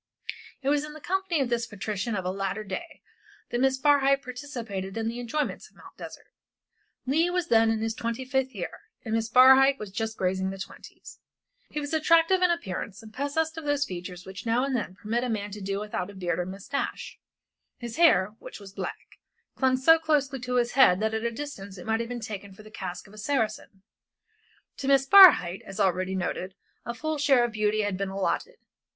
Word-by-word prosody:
It 270 - +1
was 290 0 +2
in 300 0 -8
the 310 - -10
company 365 -1 -1
of 260 - 0
this 235 -1 -1
patrician 210 +1 -3
of 190 -2 -3
a 180 - 0
later 195 +2 -3
day 315 - -7 0.5
that 240 - -1
Miss 265 0 +3
Barhyte 275 -1 +3
participated 235 -7 -6
in 225 0 -1
the 235 +2 -4
enjoyments 245 +5 -3
of - - -32
Mt. - - -15
Desert. - - -10 0.8
Leigh 315 +7 +2
was 355 -1 -1
then 225 -1 +5
in 225 -1 0
his 225 0 -1
twenty 235 +3 -4
fifth 265 0 -1
year, - - -6 0.3
and 220 - -3
Miss 225 0 0
Barhyte 265 +3 +7
was 210 -5 -8
just 220 +2 -3
grazing 190 0 0
the 195 - -6
twenties. 190 - -11 0.5
He 300 - -4
was 290 +1 -5
attractive 330 +3 +4
in 360 - +4
appearance, 205 - -4
possessed 315 +5 -2
of 315 - -10
those 290 -1 +1
features 180 -1 -7
which 190 +2 -8
now 235 +2 +1
and 275 -1 -1
then 200 -6 -3
permit 225 +4 -2
a 250 - -2
man 205 -2 -3
to 210 +1 -8
do 195 +1 -2
without 205 -2 -5
beard 175 -2 -2
or 180 - -2
moustache, 200 +9 -5 0.6
and 240 - -5
his 235 - -8
hair, 210 - +4
which - - -10
was 195 -1 -12
black, - - -7 0.4
clung 260 -1 +2
so 325 +5 +6
closely 290 -4 0
to 250 +1 -3
his 240 -1 +2
head 250 -9 +5
that 220 +1 0
at 220 0 -2
a 235 - +1
distance 225 -7 -7
it 180 - -10
might 225 0 0
have 230 0 -3
been 245 -1 -4
taken 200 -3 -7
for 215 - -14
the 215 - -14
casque 180 -4 -6
of 200 - -17
a 215 - -12
Saracen. 215 -5 -2 0.9
To 270 - -5
Miss 275 -1 +4
Barhyte, 270 - +8
as 195 +2 -10
already 185 -1 +1
noted, 185 0 -3 0.3
a 235 - -3
full 310 +4 -3
share 275 -4 +4
of 240 - -1
beauty 215 -1 +1
had 205 -2 -2
been 195 -1 -2
allotted. 195 - -2
230 Hz, 210 wpm, -27 LUFS, 200-275 Hz, 0.9 s, Barhyte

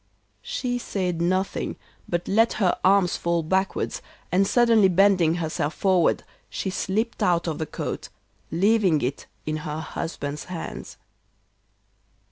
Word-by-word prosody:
She 260 - -2
said 180 -7 -2
nothing, 185 +3 0 0.3
but 175 0 -1
let 225 +3 +3
her 190 -5 +2
arms 190 -2 +4
fall 170 -1 0
backwards, 190 +4 -1 0.3
and 195 +2 +3
suddenly 230 -4 +5
bending 185 -3 +4
herself 160 -2 -2
forward, 185 -4 +2 0.3
she 190 - -3
slipped 215 +5 -2
out 170 -1 +2
of 160 -2 -2
the 160 - -2
coat, - - -5 0.4
leaving 190 -3 +3
it 130 +3 -3 0.2
in 155 0 -1
her 150 0 -4
husband's 150 -2 -5
hands. 175 -2 -7
180 Hz, 125 wpm, -25 LUFS, 165-200 Hz, 0.4 s, suddenly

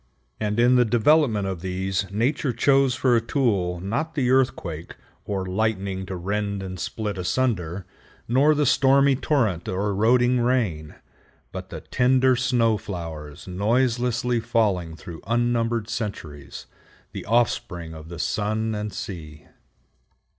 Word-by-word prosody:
And 105 +1 -1
in 125 +2 +5
the 125 - +6
development 120 -1 +3
of 95 -3 -4
these 95 0 -2
Nature 125 +6 0
chose 135 +2 +3
for 130 -2 +2
a 115 - +3
tool 105 -9 0
not 120 - -3
the 130 -4 +1
earthquake 100 -11 0 0.3
or 95 -2 -2
lightning 95 -1 -2
to 95 - -4
rend 100 +2 -2
and 95 -1 -6
split 105 +1 -4
asunder, 95 -4 -1 0.4
not 140 +6 +4
the 150 0 +2
stormy 135 +1 +4
torrent 115 - 0
or 100 +3 -1
eroding 120 +5 +3
rain, 110 -12 0 0.6
but - - -7
the - - -7
tender 130 +1 +3
snow 120 -3 +2
flowers 80 -6 -7
noiselessly 120 +4 +1
falling 95 -8 0
through 80 0 -10
unnumbered 115 -1 0
centuries, 85 - -6 0.5
the - - -6
offspring 95 -7 0
of 80 0 -10
the 85 - -7
sun 110 +6 -1
and 105 -1 -4
sea. 80 -8 -7
110 Hz, 130 wpm, -24 LUFS, 95-125 Hz, 0.6 s, the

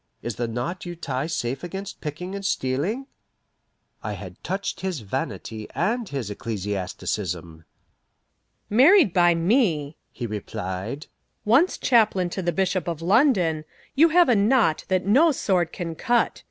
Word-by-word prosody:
Is 120 -3 -4
the 120 - -1
knot 120 +11 -4
you 175 -1 -6
tie 140 -3 -3
safe 135 -5 -3
against 195 +3 -6
picking 170 +5 -5
and 200 0 -5
stealing?" 180 - -1 1.0
I - - -4
had - - -10
touched 195 +1 -3
his 185 -8 -3
vanity 110 +1 -5
and 225 +5 0
his 130 -7 -4
ecclesiasticism. 95 -5 -4 1.0
"Married 270 - +6
by 175 -2 +4
me," 165 - +1
he 120 - -5
replied, 105 +3 -5 0.4
"once 270 - +4
chaplain 210 -7 +2
to 190 - -3
the 175 -1 0
Bishop 190 0 0
of 165 -1 -3
London, 185 - +3 0.3
you 325 +4 +5
have 350 +2 +5
a 245 - +4
knot 210 -5 +3
that 185 -1 0
no 280 +11 +5
sword 180 - 0
can 170 -3 -5
cut. 240 +8 +1
175 Hz, 140 wpm, -24 LUFS, 130-210 Hz, 1.0 s, Married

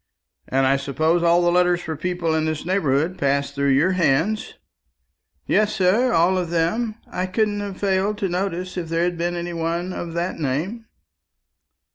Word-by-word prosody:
"And 135 0 +1
I 135 +1 +3
suppose 155 +5 0
all 170 +1 +4
the 175 - +3
letters 180 0 +3
for 160 -2 -5
people 175 +1 -2
in 160 0 +1
this 155 -1 -3
neighbourhood 170 -2 0
pass 140 0 +1
through 140 0 0
your 155 +8 +3
hands?" 180 +4 +1 0.9
"Yes, 215 0 +2
sir, 215 +6 +3
all 180 +1 +3
of 175 -2 -3
them; 190 +7 0 0.2
I 180 +1 -2
couldn't 205 +2 0
have 200 -2 -5
failed 200 +1 0
to 200 - -1
notice 185 0 -3
if 170 -3 -4
there 165 +1 +1
had 175 0 0
been 175 +1 -1
any 175 0 -4
one 170 +2 -2
of 170 -2 -5
that 170 +1 -2
name." 165 - -2
175 Hz, 175 wpm, -22 LUFS, 160-190 Hz, 0.9 s, all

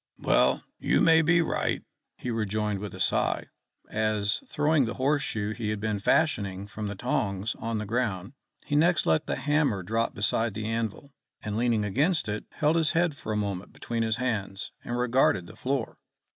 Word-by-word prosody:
"Well, - - +3 0.2
you - - +2
may 160 0 +6
be 165 +1 +4
right," - - -1 0.3
he 125 - -4
rejoined 105 -2 -1
with 105 0 -6
a - - -10
sigh, - - +1 0.4
as, 110 -1 0
throwing 150 - +2
the 115 - -4
horse 140 +2 +2
shoe 105 -6 -2
he 110 -1 -3
had 105 -1 -2
been 105 -1 -1
fashioning 100 -7 +1
from 105 +1 -5
the 100 - -4
tongs 100 -2 -1
on 115 0 -2
the 105 - -3
ground, 105 -2 -2 0.3
he 145 - -1
next 170 +3 +3
let 80 -1 +2
the - - 0
hammer 145 -10 +1
drop 115 +5 -1
beside 110 +1 +1
the 110 0 -3
anvil, 115 +5 -3 0.3
and 105 -1 -3
leaning 115 -2 +1
against 145 - +1
it 105 0 -3
held 155 +2 +1
his 160 -1 +2
head 165 -2 +2
for 110 - -6
a 105 - 0
moment 100 -2 -3
between 115 -1 -3
his 110 -1 +1
hands, 110 -5 -3
and 120 - -3
regarded 125 -6 +2
the - - -12
floor. 130 -3 -2
115 Hz, 185 wpm, -27 LUFS, 105-140 Hz, 0.4 s, may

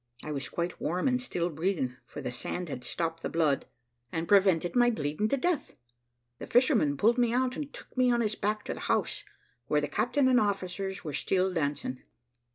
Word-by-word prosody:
I 155 - -5
was 140 -2 -3
quite 170 +1 -3
warm 175 - 0
and 250 -1 +2
still 175 -8 -2
breathing, 160 -5 -1
for - - -7
the 125 - -3
sand 175 +7 -4
had 125 -3 -5
stopped 165 +5 -3
the - - -2
blood, 155 -4 +1 0.4
and 165 0 -2
prevented 190 -4 +4
my 240 0 +5
bleeding 155 -1 -1
to 275 - +1
death. 340 +2 -1 0.6
The - - -7
fisherman 235 - +3
pulled 230 - +3
me 240 -1 +2
out 255 0 +1
and 290 -2 -5
took - - -13
me 255 -1 +4
on 240 0 +2
his 215 -2 0
back 215 0 -2
to - - -2
the - - -8
house - - 0 0.4
where 150 - +3
the 145 - -1
captain 245 - +1
and 255 -1 +5
officers 195 -2 -2
were 150 -4 -5
still 190 +3 +1
dancing. 145 -5 -2
190 Hz, 200 wpm, -29 LUFS, 155-240 Hz, 0.6 s, my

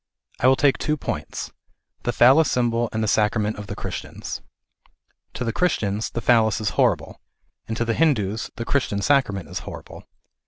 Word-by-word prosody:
I 125 - +3
.will 130 - +6
take 140 0 +2
two 150 0 0
points, - - -5 0.5
the 120 - +1
Phallas 135 +6 +5
symbol 120 -1 +1
and 110 0 -1
the - - 0
sacrament 105 +1 +1
of 105 - -7
the 100 - -5
Christians. 90 -7 -6 0.9
To - - -3
the 115 -2 -2
Christians 110 - 0
the 120 - -4
Phallas 115 -3 +3
is 105 -2 -1
horrible, - - 0 0.5
and 110 0 -3
to 120 - 0
the 115 - 0
Hindus 115 -9 +1
the 115 - -5
Christian 110 -8 0
sacrament 115 -10 +1
is - - -5
horrible. - - -10
115 Hz, 170 wpm, -23 LUFS, 105-130 Hz, 0.9 s, will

